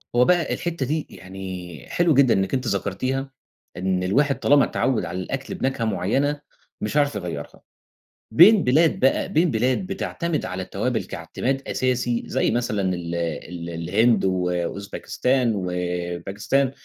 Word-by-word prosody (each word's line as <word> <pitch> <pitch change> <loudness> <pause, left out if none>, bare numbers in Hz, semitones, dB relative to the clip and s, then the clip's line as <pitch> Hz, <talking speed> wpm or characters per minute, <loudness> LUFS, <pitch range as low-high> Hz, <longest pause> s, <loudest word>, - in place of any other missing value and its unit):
هو 125 +1 +5
بقى 175 0 +2
الحتة 170 -6 -2
دي 155 +3 -2
يعني 95 -5 -8
حلو 175 -2 +3
جدًا 135 -3 +5
إنِك 95 0 0
أنتِ 130 -2 0
ذكرتيها، 130 +8 -2 0.5
إن 90 0 0
الواحد 140 +9 +2
طالما 140 -1 +5
اتعوّد 125 -8 0
على 85 +2 -4
الأكل 135 +8 -4
بنكهة 130 -3 -1
معينة، 135 +9 0 0.4
مش 150 - -1
هيعرف 145 -5 +2
يغيّرها، 85 -7 -6 0.7
بين 200 - +8
بلاد 155 +6 +3
بقى 135 - +2
بين 165 +1 +2
بلاد 125 - 0
بتعتمِد 170 -4 -2
على 95 0 -4
التوابل - - -2
كاعتماد 135 +1 -3
أساسي، 125 -2 0
زي - - 0
مثلًا 115 -3 0
ال 85 -1 -4
ال 85 0 -4
الهند 95 +6 +2
واوزباكستان 95 +7 0
وباكستان 90 +7 -1
115 Hz, 135 wpm, -23 LUFS, 90-135 Hz, 0.7 s, بين